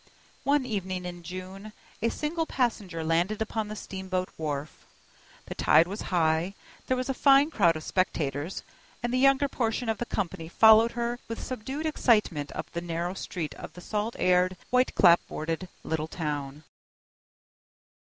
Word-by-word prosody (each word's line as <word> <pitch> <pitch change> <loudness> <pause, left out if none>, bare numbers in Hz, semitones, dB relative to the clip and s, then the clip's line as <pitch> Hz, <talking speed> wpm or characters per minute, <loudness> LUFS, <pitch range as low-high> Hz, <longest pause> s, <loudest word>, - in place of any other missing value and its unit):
One 280 -1 +3
evening 185 -5 -3
in 175 -1 -6
June, 185 +4 -8 0.3
a 230 - +2
single 320 +5 -2
passenger 205 -10 -1
landed 170 +6 +1
upon 220 -1 -2
the 215 - -6
steamboat 190 -2 -4
wharf. 150 -2 -5 0.6
The - - -6
tide 165 - +4
was 200 +4 -5
high, 170 +1 +1 0.3
there 255 - +1
was 255 - -2
a 270 - 0
fine 275 +3 +5
crowd 175 - +3
of 155 - -6
spectators, 160 -3 -1 0.4
and 240 0 -1
the 255 - +2
younger 275 +1 +4
portion 235 -2 -1
of 220 - -1
the 240 - -3
company 165 -4 -3
followed 220 +5 +6
her 240 0 -2
with 230 - -5
subdued 265 +5 -5
excitement 210 - +2
up - - -5
the 170 - -3
narrow 170 +1 -3
street 170 -5 -5
of 155 - -10
the 180 - -11
salt 215 +5 -2
aired, 180 0 +3
white 255 0 +2
clapboarded 170 -1 +3
little 160 -1 -2
town. 150 -3 -4
190 Hz, 155 wpm, -28 LUFS, 165-235 Hz, 0.6 s, followed